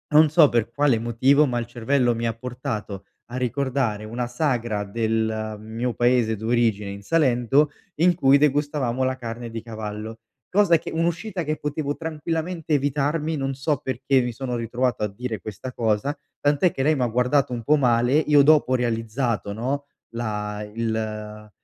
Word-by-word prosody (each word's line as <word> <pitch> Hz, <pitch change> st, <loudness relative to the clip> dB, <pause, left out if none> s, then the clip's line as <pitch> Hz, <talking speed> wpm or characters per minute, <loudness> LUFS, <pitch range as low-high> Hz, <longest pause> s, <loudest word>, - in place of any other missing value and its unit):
non 155 Hz, -1 st, +7 dB
so 155 Hz, -3 st, +6 dB
per 115 Hz, -1 st, 0 dB
quale 140 Hz, -1 st, +2 dB
motivo, 125 Hz, +6 st, +3 dB
ma 120 Hz, -3 st, -1 dB
il 120 Hz, -, -4 dB
cervello 120 Hz, +1 st, +1 dB
mi 115 Hz, +1 st, -3 dB
ha 115 Hz, -, 0 dB
portato 115 Hz, -4 st, -5 dB, 0.2 s
a 125 Hz, +1 st, -6 dB
ricordare 130 Hz, -3 st, -1 dB
una 120 Hz, +3 st, -3 dB
sagra 120 Hz, -5 st, -1 dB
del 110 Hz, 0 st, -1 dB
mio 115 Hz, +3 st, -3 dB
paese 120 Hz, -2 st, +2 dB
d'origine 110 Hz, -2 st, 0 dB
in 100 Hz, 0 st, -8 dB
Salento, 135 Hz, 0 st, +3 dB, 0.3 s
in 175 Hz, 0 st, +5 dB
cui 140 Hz, -4 st, +5 dB
degustavamo 145 Hz, -3 st, +1 dB
la 130 Hz, 0 st, 0 dB
carne 120 Hz, -1 st, -6 dB
di 115 Hz, -1 st, -5 dB
cavallo, 110 Hz, -1 st, -6 dB, 0.4 s
cosa 195 Hz, -5 st, +5 dB
che -, -, -7 dB
un'uscita 170 Hz, +3 st, -1 dB
che 155 Hz, 0 st, -2 dB
potevo 145 Hz, 0 st, -3 dB
tranquillamente 160 Hz, +1 st, -3 dB
evitarmi, 145 Hz, +3 st, 0 dB
non 135 Hz, -2 st, -2 dB
so 140 Hz, +2 st, 0 dB
perché 130 Hz, 0 st, +1 dB
mi 120 Hz, 0 st, -2 dB
sono 125 Hz, +1 st, -4 dB
ritrovato 120 Hz, +1 st, -1 dB
a -, -, +2 dB
dire 110 Hz, 0 st, -5 dB
questa 110 Hz, +6 st, -7 dB
cosa, 115 Hz, +5 st, 0 dB, 0.2 s
tant'è 145 Hz, +5 st, +2 dB
che 135 Hz, -, -4 dB
lei 155 Hz, +2 st, +3 dB
m'ha 125 Hz, -3 st, +1 dB
guardato 125 Hz, +4 st, +1 dB
un 120 Hz, -1 st, -3 dB
po' 150 Hz, +6 st, +4 dB
male, 120 Hz, -2 st, +2 dB
io 150 Hz, -1 st, +5 dB
dopo 150 Hz, -2 st, +4 dB
ho -, -, +4 dB
realizzato, 115 Hz, -2 st, -1 dB
no, 135 Hz, +6 st, -2 dB, 0.3 s
la 105 Hz, -2 st, -3 dB
il 115 Hz, 0 st, -1 dB
l 105 Hz, -1 st, -5 dB
125 Hz, 170 wpm, -24 LUFS, 115-145 Hz, 0.4 s, non